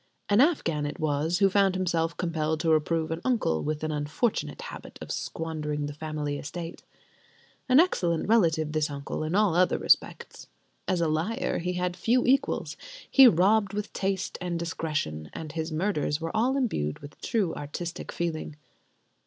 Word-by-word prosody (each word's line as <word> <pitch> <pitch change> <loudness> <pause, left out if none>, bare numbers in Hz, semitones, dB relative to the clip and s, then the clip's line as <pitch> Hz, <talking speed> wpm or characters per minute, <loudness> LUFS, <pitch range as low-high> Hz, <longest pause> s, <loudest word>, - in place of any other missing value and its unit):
An 205 +3 +5
Afghan 165 - +2
it 145 - -6
was 155 +2 0
who 195 +1 +5
found 195 -1 +3
himself 170 -3 0
compelled 160 -3 -1
to 165 -1 +2
reprove 160 +1 +1
an 165 +1 -3
uncle 225 - +1
with 155 0 -3
an 155 - -1
unfortunate 150 +10 -1
habit - - -10
of - - -7
squandering 150 -2 -3
the 145 - -5
family 150 -1 -4
estate. 165 +3 -7 0.9
An 255 +2 +7
excellent 175 - +2
relative, 165 -8 +3
this 155 -1 0
uncle, 140 +2 -4
in 155 +4 -2
all 205 -4 +3
other 180 +1 +3
respects. - - 0 0.4
As 185 -2 +1
a 165 - +2
liar, 160 +9 -1
he 180 +1 -2
had 180 0 -1
few 235 +7 +2
equals; 270 +2 +1 0.3
he 270 -2 +9
robbed 200 +1 +3
with 210 0 -4
taste 195 -1 -2
and 175 -1 -2
discretion; 155 - -3
and 155 -2 -6
his 160 +1 -3
murders 155 -3 0
were 165 +3 -4
all 250 +5 +2
imbued 75 - -1
with 145 0 -13
true 200 -8 0
artistic 165 +4 -6
feeling. 160 -3 -3
165 Hz, 165 wpm, -27 LUFS, 155-195 Hz, 0.9 s, he